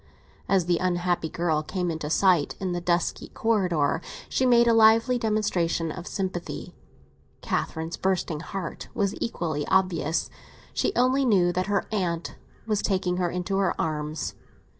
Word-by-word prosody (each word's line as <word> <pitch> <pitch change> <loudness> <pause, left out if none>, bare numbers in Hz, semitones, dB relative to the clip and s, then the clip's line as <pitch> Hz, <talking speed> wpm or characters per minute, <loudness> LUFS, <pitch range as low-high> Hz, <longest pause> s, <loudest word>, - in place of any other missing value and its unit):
As 190 -3 +3
the 175 -1 +1
unhappy 175 -2 0
girl 160 -2 0
came 180 +2 -2
into 160 -2 -4
sight, 175 -3 +3
in 185 -2 -2
the 175 0 -2
dusky 175 0 0
corridor, 180 -9 +1 0.3
she 260 - +1
made 235 -1 +5
a 230 - +5
lively 225 +2 +5
demonstration 190 -7 0
of 180 +2 -7
sympathy. 185 -3 -4 0.7
Catherine's 160 +1 -2
bursting 185 -5 -1
heart 180 0 -6
was 200 -3 +1
equally 160 -9 -2
oblivious. 175 -4 +1 0.4
She - - +1
only 255 +2 +3
knew 185 -8 +3
that 185 +1 -1
her 205 -1 +1
aunt 175 -5 -2 0.3
was 215 -2 0
taking 185 -2 0
her 180 -1 +1
into 180 +2 -2
her 195 -2 0
arms. 155 0 -2
180 Hz, 145 wpm, -26 LUFS, 170-200 Hz, 0.7 s, made